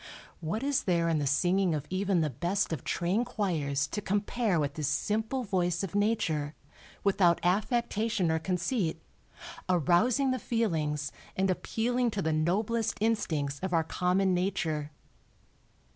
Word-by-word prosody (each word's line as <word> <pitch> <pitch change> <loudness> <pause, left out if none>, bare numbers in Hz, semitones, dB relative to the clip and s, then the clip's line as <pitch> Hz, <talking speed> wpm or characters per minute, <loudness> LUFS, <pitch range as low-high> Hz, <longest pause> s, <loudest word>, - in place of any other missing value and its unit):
What 190 +10 -3
is 280 -1 0
there 170 -2 +2
in 160 -2 +1
the 145 - -1
singing 175 +5 +2
of 150 -1 -4
even 190 -2 +1
the 155 - +1
best 175 - -1
of 160 - -4
trained 190 +7 0
choirs 155 - -1
to 210 - -3
compare 205 -1 0
with 145 -2 -1
this 155 -4 -2
simple 220 - -1
voice 180 -4 0
of 195 - -4
Nature, 170 -8 0 0.5
without 190 -4 +3
affectation 210 -1 +1
or 160 - +1
conceit, 180 0 -1 0.7
arousing 185 - +3
the 255 - -1
feelings 155 -12 -1 0.2
and 190 0 +2
appealing 240 +6 0
to 205 -3 -2
the 160 - +1
noblest 205 +8 0
instincts 160 -11 0
of 190 -1 -3
our 165 -1 +3
common 185 +3 +1
nature. 170 -5 -1
185 Hz, 145 wpm, -29 LUFS, 160-215 Hz, 0.7 s, without